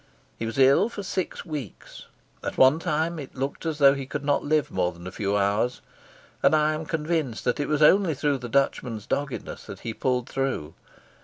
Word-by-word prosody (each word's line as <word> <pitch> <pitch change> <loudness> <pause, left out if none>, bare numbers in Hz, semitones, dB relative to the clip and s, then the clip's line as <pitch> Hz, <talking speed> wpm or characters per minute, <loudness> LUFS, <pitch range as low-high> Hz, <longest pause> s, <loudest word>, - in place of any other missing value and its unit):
He 115 - -2
was 115 - -5
ill 135 - +5
for 205 -3 -7
six 185 -1 -3
weeks. 150 - -8 0.4
At - - -4
one 135 +4 +6
time 160 +1 -1
it 140 - -9
looked 135 +5 -3
as 160 -2 -2
though 140 -2 +7
he 135 -2 -5
could 145 0 -5
not 145 -1 +2
live 155 0 +1
more 90 -1 0
than 85 0 -13
a 90 - -6
few 100 +1 -1
hours, 105 +5 0 0.6
and - - +5
I 155 0 +3
am 155 0 -5
convinced 155 -6 -1
that 125 - 0
it 145 - -1
was 150 0 +2
only 180 0 +5
through 145 0 0
the 120 -1 -7
Dutchman's 125 -5 0
doggedness 140 -2 -4
that - - -9
he 115 - -4
pulled 125 +1 -1
through. 130 - -2
140 Hz, 205 wpm, -25 LUFS, 120-155 Hz, 0.6 s, though